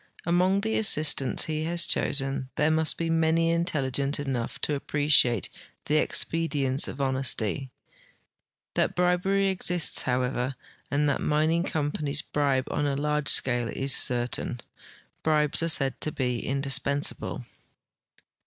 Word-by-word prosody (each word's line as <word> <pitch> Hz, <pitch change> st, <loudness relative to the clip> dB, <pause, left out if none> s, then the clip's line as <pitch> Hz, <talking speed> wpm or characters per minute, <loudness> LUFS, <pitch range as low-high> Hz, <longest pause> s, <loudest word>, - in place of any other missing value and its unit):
Among 180 Hz, +3 st, +2 dB
the 220 Hz, +1 st, -1 dB
assistants 150 Hz, -9 st, +2 dB
he 155 Hz, 0 st, -3 dB
has 170 Hz, +1 st, 0 dB
chosen 135 Hz, -1 st, -1 dB
there 150 Hz, +2 st, +2 dB
must 160 Hz, 0 st, +1 dB
be 165 Hz, -, -2 dB
many 165 Hz, 0 st, +2 dB
intelligent 140 Hz, -4 st, -1 dB
enough 135 Hz, -5 st, -4 dB
to 150 Hz, -, 0 dB
appreciate 140 Hz, -6 st, +2 dB, 0.4 s
the 150 Hz, -, +1 dB
expedienc}'' 145 Hz, -5 st, +1 dB
of -, -, -7 dB
honest3^ 130 Hz, -1 st, -1 dB, 1.0 s
That -, -, 0 dB
bribery 180 Hz, +2 st, +1 dB
exists, 180 Hz, -3 st, +1 dB
however, 125 Hz, +1 st, -1 dB, 0.3 s
and 145 Hz, +1 st, +1 dB
that 140 Hz, -, 0 dB
mining 155 Hz, +3 st, +1 dB
companies 145 Hz, -2 st, -2 dB
bribe 140 Hz, -3 st, 0 dB
on 145 Hz, -, -1 dB
a 140 Hz, -, -1 dB
large 150 Hz, 0 st, 0 dB
scale 120 Hz, -2 st, +2 dB
is 135 Hz, +3 st, 0 dB
certain. 120 Hz, 0 st, +1 dB, 0.6 s
Bribes 150 Hz, -1 st, +2 dB
are 165 Hz, -, 0 dB
said 135 Hz, -4 st, +1 dB
to 155 Hz, -, +1 dB
be 125 Hz, -4 st, -2 dB
indispensable. 140 Hz, +1 st, -1 dB
145 Hz, 125 wpm, -26 LUFS, 135-160 Hz, 1.0 s, Among